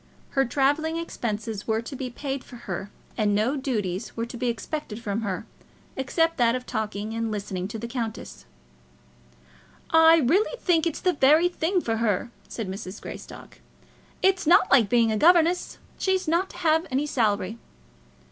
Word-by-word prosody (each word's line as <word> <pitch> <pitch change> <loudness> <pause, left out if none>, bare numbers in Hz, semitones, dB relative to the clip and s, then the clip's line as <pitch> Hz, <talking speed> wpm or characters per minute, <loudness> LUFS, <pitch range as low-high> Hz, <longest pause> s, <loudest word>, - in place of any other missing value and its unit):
Her 270 0 +2
travelling 290 +6 +1
expenses 225 -9 -4
were 220 0 0
to 270 - -7
be 255 -1 -4
paid 270 +2 -4
for - - -13
her, 195 -4 -6 0.3
and 210 -3 +2
no 225 +7 +1
duties 220 -8 -3
were 230 - -1
to 235 - -9
be 245 +1 -2
expected 235 0 -4
from 220 -1 -3
her, 195 -2 -3 0.5
except 325 +5 0
that 235 -1 +3
of 250 0 -5
talking 215 0 -3
and 230 0 -2
listening 195 -3 -3
to 215 - -6
the 230 +2 -5
countess. 225 - -5 1.5
"I 325 0 +7
really 355 - +2
think 340 -6 +2
it's 325 - -4
the 365 - +2
very 305 +5 +5
thing 355 +1 0
for 225 -5 -1
her," 225 0 0 0.2
said 225 -4 -5
Mrs. 190 +1 -6
Greystock. - - -10 0.6
"It's 380 -3 +3
not 360 +3 +5
like 235 -7 +5
being 230 -1 +3
a 215 - 0
governess. 345 +5 +3 0.2
She's 380 -2 0
not 340 +4 +1
to - - -12
have 320 -2 +2
any 270 +3 0
salary." 220 -5 0
245 Hz, 165 wpm, -25 LUFS, 215-320 Hz, 1.5 s, I